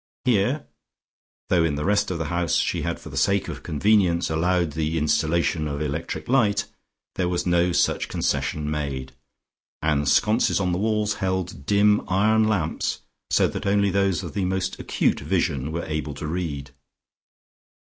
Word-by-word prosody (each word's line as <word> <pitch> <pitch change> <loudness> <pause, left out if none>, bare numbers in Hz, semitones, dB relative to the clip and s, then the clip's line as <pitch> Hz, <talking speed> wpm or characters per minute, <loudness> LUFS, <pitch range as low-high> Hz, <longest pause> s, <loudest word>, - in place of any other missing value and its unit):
Here, 125 +5 +1 0.8
though 85 -2 +3
in 80 -3 0
the 75 - -3
rest 105 +1 +2
of 90 - -2
the 80 - -3
house 85 -1 +1
she - - 0
had - - -3
for - - -10
the - - -7
sake 100 0 +2
of - - -6
convenience 90 0 +2
allowed 85 +1 +1
the 80 +2 -1
installation 80 +1 +1
of 70 -1 -3
electric 75 +2 -4
light, 110 -5 +2 0.5
there 90 -1 +1
was 90 -1 -1
no 85 0 +2
such - - +1
concession 75 -1 -1
made, 70 -3 -3 0.7
and 75 -2 +1
sconces 105 - +3
on 90 -2 0
the 90 - -1
walls 105 -1 +1
held 95 -6 -2
dim 105 0 +4
iron 110 +4 +3
lamps, 95 -8 -1 0.3
so - - +3
that - - -4
only 100 0 +3
those 95 -2 +1
of - - -7
the 100 -2 -1
most 95 0 -2
acute - - 0
vision 70 +2 -1
were 85 +1 -3
able 75 -2 -3
to - - -6
read. 75 -4 -4
90 Hz, 165 wpm, -24 LUFS, 75-100 Hz, 0.8 s, dim